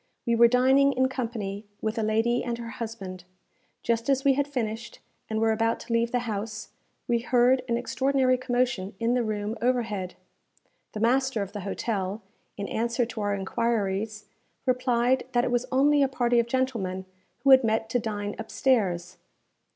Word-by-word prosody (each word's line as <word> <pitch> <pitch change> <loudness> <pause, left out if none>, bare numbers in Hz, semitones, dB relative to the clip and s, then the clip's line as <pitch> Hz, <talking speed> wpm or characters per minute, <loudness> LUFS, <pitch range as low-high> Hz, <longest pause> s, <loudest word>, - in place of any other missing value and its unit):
We 235 - +1
were 235 +1 +7
dining 265 +3 +4
in 260 0 +2
company 225 -6 -4 0.2
with 220 +1 -2
a - - +1
lady 225 +3 +1
and 240 -1 -3
her 230 -1 -7
husband. 195 -5 -6 0.6
Just 230 +2 0
as 270 -1 +2
we 280 -1 +5
had 285 +1 0
finished, 230 -4 -4 0.3
and 220 0 -1
were 225 0 +3
about 225 +1 +1
to 235 - -5
leave 230 0 +1
the 245 - +1
house, 215 0 -4 0.4
we 235 -1 +2
heard 250 +2 +3
an 235 - +2
extraordinary 260 +1 +1
commotion 245 -6 -1
in 230 +1 +1
the 250 - +2
room 215 0 -2
overhead. 225 -7 -1 0.8
The 210 - -5
master 255 -1 +2
of 200 - -9
the 205 - -4
hotel, 200 +1 -3 0.3
in 200 -1 -4
answer 235 +2 0
to 225 -2 -6
our 205 0 0
enquiries, 210 0 -1 0.4
replied 255 0 +1
that 240 0 +3
it 245 - -1
was 245 +1 0
only 285 +2 +4
a 275 - +4
party 245 -2 +2
of 235 - +1
gentlemen 230 -8 -1 0.4
who 275 - +5
had 265 -1 +8
met 220 0 +1
to 245 - +2
dine 205 -2 -3
upstairs. 190 -7 0
235 Hz, 175 wpm, -27 LUFS, 215-255 Hz, 0.8 s, had